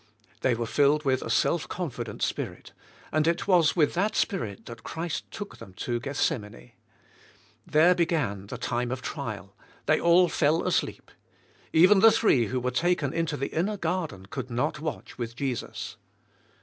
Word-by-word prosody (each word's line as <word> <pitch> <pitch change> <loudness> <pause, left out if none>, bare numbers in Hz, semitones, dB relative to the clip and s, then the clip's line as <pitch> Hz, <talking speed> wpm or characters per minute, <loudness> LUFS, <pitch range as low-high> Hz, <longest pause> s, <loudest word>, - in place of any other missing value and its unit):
" - - -32
They 130 -2 +2
were 115 0 -2
filled 145 +5 +2
with 130 -1 +2
a - - -5
self 170 - +1
confident 120 - -4
spirit, - - -3 0.4
and 155 +1 +2
it 170 +3 0
was 175 -5 +4
with 155 -5 +3
that 200 +5 0
spirit 115 - -1
that 115 -1 -9
Christ 165 0 -4
took 205 -1 -8
them 95 - -12
to 120 +3 -2
Gethsemane. 120 -3 -3 1.0
There 160 +4 +5
began 155 - -1
the 125 - -6
time 120 0 -2
of 130 0 -4
trial; - - -5 0.3
they - - +3
all 175 +1 +5
fell 160 +1 +1
asleep. 185 - -1 0.6
Even 185 +5 +6
the 225 +2 +8
three 130 - +3
who 130 +3 -1
were 125 +1 -1
taken 160 0 +1
into 165 -2 -1
the 140 - -4
inner 200 +6 0
gar 180 -1 -1
den 95 -7 -12
could 130 +5 -6
not 125 +7 -1
watch 155 -4 -6
with 115 -1 -4
Jesus. 130 -3 -4
145 Hz, 170 wpm, -27 LUFS, 120-170 Hz, 1.0 s, the